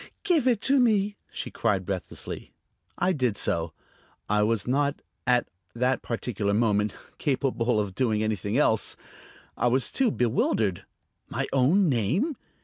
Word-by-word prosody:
"Give 340 -10 +2
it 235 -5 +3
to 275 +3 +3
me!" 210 -4 +3 0.2
she - - -5
cried 100 -5 0
breathlessly. 95 -2 -5 0.5
I 180 +1 +2
did 125 - 0
so. 80 0 0 0.6
I 105 0 +2
was 110 0 +1
not, 140 +2 +1 0.3
at 125 -1 +3 0.3
that 125 +2 +1
particular 110 -4 -2
moment, 105 -2 +1 0.2
capable 125 -4 +1
of 100 -3 -2
doing 110 -2 +1
anything 110 +1 -1
else. 110 -7 +1 0.6
I - - +1
was 130 +2 +2
too 265 -3 +2
bewildered. 110 - 0 0.4
My - - -2
own 155 +9 +4
name! 150 - +1
120 Hz, 140 wpm, -27 LUFS, 105-150 Hz, 0.6 s, own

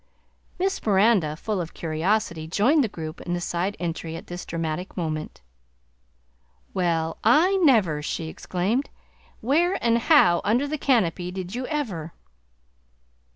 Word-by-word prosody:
Miss 385 +1 -1
Miranda, 195 -6 +3
full 205 +3 -2
of 165 - -7
curiosity, 165 0 -1
joined 250 - +3
the - - +1
group 160 -4 -7
in 175 - -3
the - - -2
side 175 +3 -2
entry 165 -1 -4
at - - -8
this 175 0 -7
dramatic 165 +3 -4
moment. 155 - -4 1.3
"Well, 165 -3 0
I 325 - +5
never!" 220 - +3
she 160 +2 -3
exclaimed. 195 - -2 0.5
"Where, 335 - +2
and 235 0 +2
how 230 - +5
under 240 +7 +1
the 305 +1 -3
canopy, 185 -10 +1
did 185 0 -6
you 250 +1 -3
ever?" 200 - -3
185 Hz, 135 wpm, -24 LUFS, 165-240 Hz, 1.3 s, I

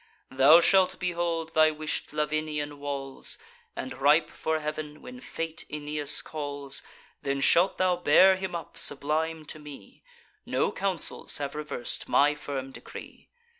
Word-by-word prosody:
Thou 140 +6 +7
shalt 185 +1 +4
behold 170 -2 -2
thy 155 0 +6
wish'd 155 0 -4
Lavinian 150 -1 -2
walls; 140 -1 -4 0.4
And, 130 - -5
ripe 150 +3 +4
for 160 0 -1
heav'n, 150 0 -5
when 250 0 -9
fate 165 -9 -5
Aeneas 150 -1 -1
calls, 145 -3 -5 0.4
Then 140 0 -1
shalt 175 +6 +4
thou 185 -1 +2
bear 185 +3 +6
him 190 -1 -4
up, 170 - -5
sublime, 155 +3 0
to 155 - -8
me: 150 -2 -12 0.4
No 475 -1 0
councils 190 - -1
have 140 -1 -4
revers'd 150 -5 -3
my 145 +1 +4
firm 135 -2 -5
decree. - - -11
150 Hz, 135 wpm, -28 LUFS, 145-165 Hz, 0.4 s, Thou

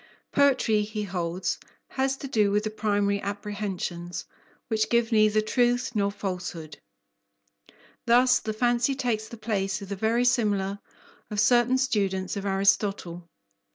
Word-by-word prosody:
Poetry, 260 -6 +3
he 210 0 -4
holds, 180 -2 -2 0.3
has 270 0 -1
to 275 - -6
do 215 -6 +2
with 205 +1 +1
the 215 - -3
primary 205 -2 0
apprehensions, 195 -4 -4 0.4
which 220 -1 0
give 235 0 +2
neither 215 -1 +4
truth 245 +3 +1
nor 200 -2 +1
falsehood. 180 -6 -6 1.3
Thus 250 +1 +5
the 220 - -4
fancy 240 +3 +1
takes 230 -5 -1
the 235 - -10
place 200 -3 -2
of 200 -2 -9
the 200 - -3
verisimilar 220 -3 +1 0.5
of 210 - -3
certain 240 +3 +4
students 195 -8 0
of 200 0 -4
Aristotle. 195 -3 0
210 Hz, 130 wpm, -26 LUFS, 195-235 Hz, 1.3 s, Thus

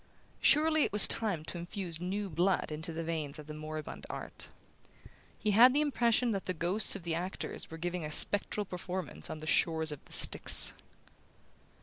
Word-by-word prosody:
Surely 310 0 +4
it - - 0
was 210 - +6
time 195 -9 0
to 175 - -5
infuse 175 -1 -5
new 200 +3 -2
blood 180 +1 0
into 160 +2 -3
the 165 +1 -4
veins 155 -3 -3
of 150 - -10
the 150 - -8
moribund 155 0 -7
art. - - -6 0.9
He 215 - 0
had 245 +6 +7
the 295 - +3
impression 245 -4 +2
that 195 -3 -3
the 185 - -2
ghosts 180 +8 +2
of 180 -4 -8
actors 170 +3 -4
were 160 - -8
giving 175 +1 -3
a 150 - -5
spectral 205 +5 +4
performance 180 0 -5
on - - -5
the 155 - -9
shores 160 -1 +1
of 150 - -6
Styx. - - +2
175 Hz, 175 wpm, -32 LUFS, 160-205 Hz, 0.9 s, had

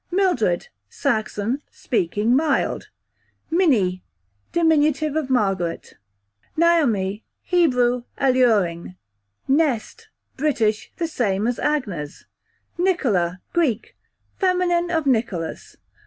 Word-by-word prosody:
Mildred, 350 - +1 0.2
Saxon, 220 - -1
speaking 210 +3 0
mild, 295 0 0 0.6
Minnie, 225 - +2 0.5
dim. 335 -1 +3 0.4
of 310 -4 -1
Margaret, 195 -9 0
q.v. - - -20 0.6
Naomi, 235 - +2 0.2
Hebrew, 250 -9 +2
alluring. 215 -11 +2 0.5
Nest, 270 -5 0 0.3
British, 230 -7 0
the 335 -2 -1
same 210 -9 -1
as 245 0 -1
Agnes, 200 - -2 0.5
Nicola, 205 - +1
Greek, 285 -11 0 0.4
feminine 360 -2 +1
of 325 -3 0
Nicholas. 220 -10 -2
245 Hz, 85 wpm, -22 LUFS, 205-320 Hz, 0.6 s, dim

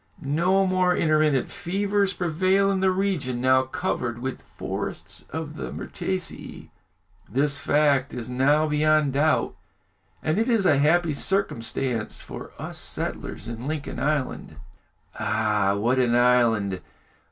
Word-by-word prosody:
No 175 +7 +2
more 185 -1 +2
intermittent 155 -4 +2
fevers 200 +1 0
prevail 185 +4 +1
in 195 - 0
the 190 0 +3
regions 185 -10 -1
now 130 +1 +4
covered 125 -2 -3
with 130 +2 -5
forests - - -6
of 160 -1 -6
the - - -5
myrtaceæ. 185 -2 -5 0.6
This 140 +2 +1
fact 140 -2 +2
is 120 -2 -5
now 140 +5 +2
beyond 150 -1 +2
doubt, 150 +3 +1 0.7
and 155 +6 +1
it 225 +3 +1
is 225 -5 +2
a 145 -6 +4
happy 160 +2 +3
circumstance 130 - 0
for - - -9
us - - -5
settlers 110 - -3
in 115 +2 -6
Lincoln 150 -2 -4
Island." 145 -2 -2 0.6
"Ah! 105 -2 +1
what 120 +5 +1
an 120 -2 +2
island! 115 -6 +3
150 Hz, 130 wpm, -25 LUFS, 125-180 Hz, 0.7 s, now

